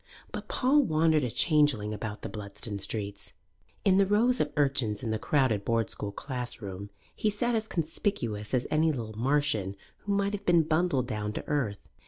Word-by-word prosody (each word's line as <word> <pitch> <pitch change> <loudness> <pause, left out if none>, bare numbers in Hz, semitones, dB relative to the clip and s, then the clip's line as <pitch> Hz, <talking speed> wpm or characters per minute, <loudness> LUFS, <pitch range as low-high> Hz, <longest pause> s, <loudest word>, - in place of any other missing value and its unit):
But - - -6
Paul 275 +4 +3
wandered 160 - +3
a 125 - 0
changeling 145 -8 +2
about 105 0 -5
the - - -3
Bludston 100 0 -4
streets. 100 -1 -3 0.5
In 190 -1 +5
the 200 - +5
rows 235 +5 +3
of - - 0
urchins 135 -8 +1
in 115 - -1
the 110 - -1
crowded 130 -7 +1
Board 115 -1 0
School 105 - -3
classroom 100 -5 -6 0.3
he 215 - +1
sat 240 +4 0
as 220 -1 0
conspicuous 135 - -2
as 125 - 0
any 155 +1 +3
little 115 -6 -5
Martian 125 -5 +1 0.2
who 200 - -2
might 200 +1 +1
have 200 -1 -4
been 170 -4 +4
bundled 155 -4 +1
down 105 -3 -3
to - - -6
earth. 125 -9 -1
135 Hz, 180 wpm, -29 LUFS, 105-170 Hz, 0.5 s, In